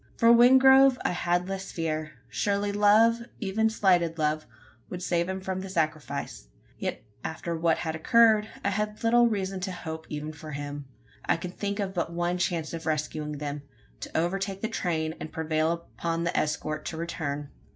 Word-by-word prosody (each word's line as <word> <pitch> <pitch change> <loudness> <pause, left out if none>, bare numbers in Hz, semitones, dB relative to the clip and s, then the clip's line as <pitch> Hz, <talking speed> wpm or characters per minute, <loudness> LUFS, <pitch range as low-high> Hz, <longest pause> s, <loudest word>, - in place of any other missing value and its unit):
For 230 0 +6
Wingrove 265 +2 +7
I - - +2
had 175 0 0
less 195 0 -5
fear. 155 -2 -3
Surely 200 - 0
love 210 +3 +5 0.2
even 220 +1 +1
slighted 180 -6 +2
love 155 0 0 0.4
would 180 0 -6
save 170 0 0
him 190 0 -2
from 190 0 -3
the 195 - -7
sacrifice? 155 - -3 0.3
Yet, - - -3 0.2
after 170 +1 -4
what 165 0 +2
had 160 -2 -3
occurred, 220 +4 +4 0.2
I 200 - +2
had 210 +1 -1
but - - -16
little 240 +1 +5
reason 195 -3 -2
to 190 +1 -3
hope 160 -3 -7
even 150 +1 -5
for 155 0 -9
him. 145 0 -5 0.4
I - - +2
could 175 +2 -7
think 200 0 -3
of 195 -2 -2
but 170 -2 -2
one 175 +1 -1
chance 170 -3 -1
of 165 -1 -6
rescuing 155 -1 -2
them: 145 0 -4 0.4
to - - -5
overtake 195 +3 -1
the 225 - 0
train, 160 -7 -1
and 155 - -7
prevail 160 +1 -1
upon 165 0 -1
the 170 - -1
escort 155 0 -1
to 160 - -4
return. 150 -4 -4
175 Hz, 180 wpm, -27 LUFS, 155-200 Hz, 0.4 s, Wingrove